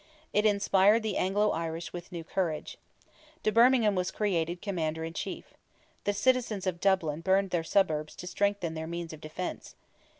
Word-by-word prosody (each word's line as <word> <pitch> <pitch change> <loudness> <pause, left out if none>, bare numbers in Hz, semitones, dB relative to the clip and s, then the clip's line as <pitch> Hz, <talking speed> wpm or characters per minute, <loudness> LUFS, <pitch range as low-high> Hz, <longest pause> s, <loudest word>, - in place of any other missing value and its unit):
It 210 +1 +4
inspired 205 +1 +4
the 215 -3 -1
Anglo 205 +3 +2
Irish 165 0 -4
with 175 -1 -8
new 170 -2 -5
courage. 165 -2 -3 0.6
De 215 - +2
Bermingham 235 -2 +5
was 180 -1 0
created 175 -4 -1
commander 160 -5 -2
in 165 0 -5
chief. - - -6 0.5
The 205 - +2
citizens 230 -3 +1
of 180 -2 -1
Dublin 170 -5 +1
burned 190 +2 +2
their 170 -2 0
suburbs 160 -4 +1
to - - -8
strengthen 200 -3 0
their 160 0 -5
means 170 -1 -5
of 155 - -11
defence. 155 +4 -6
185 Hz, 165 wpm, -29 LUFS, 165-205 Hz, 0.6 s, Bermingham